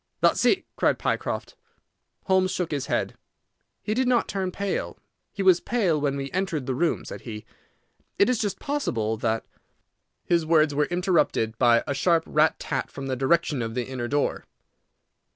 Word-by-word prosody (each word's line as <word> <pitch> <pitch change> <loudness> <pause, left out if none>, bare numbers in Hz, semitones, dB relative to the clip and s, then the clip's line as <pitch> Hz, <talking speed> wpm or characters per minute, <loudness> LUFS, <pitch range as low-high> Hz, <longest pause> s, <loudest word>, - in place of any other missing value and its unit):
"That's - - +3
it," 375 -2 +3
cried - - +2
Pycroft. - - -2 0.7
Holmes 190 -1 +2
shook 180 -3 -2
his 140 -3 -2
head. - - -1 0.7
"He 210 - -1
did 255 +3 +1
not 245 -2 +2
turn 190 -2 -2
pale. 200 +1 -3 0.3
He 200 - -3
was 185 -2 +6
pale 185 -11 0
when 140 -1 0
we 135 0 -5
entered 175 -7 -2
the 130 - -1
room," 165 +6 0
said - - -8
he. 110 -2 -8 0.7
"It 200 - +5
is 250 -3 +1
just 205 -3 -1
possible 120 - -1
that—" 110 0 -1 0.8
His 170 -1 +2
words 155 -2 +3
were 150 +1 +2
interrupted 175 - +1
by 115 -1 +5
a - - -2
sharp 165 +3 +2
rat 155 +1 +2
tat - - -3
from 140 - -7
the 130 -1 -1
direction 140 +1 +1
of 115 0 -4
the 125 -1 -1
inner 130 -2 -4
door. 145 +3 -1
160 Hz, 170 wpm, -25 LUFS, 130-190 Hz, 0.8 s, was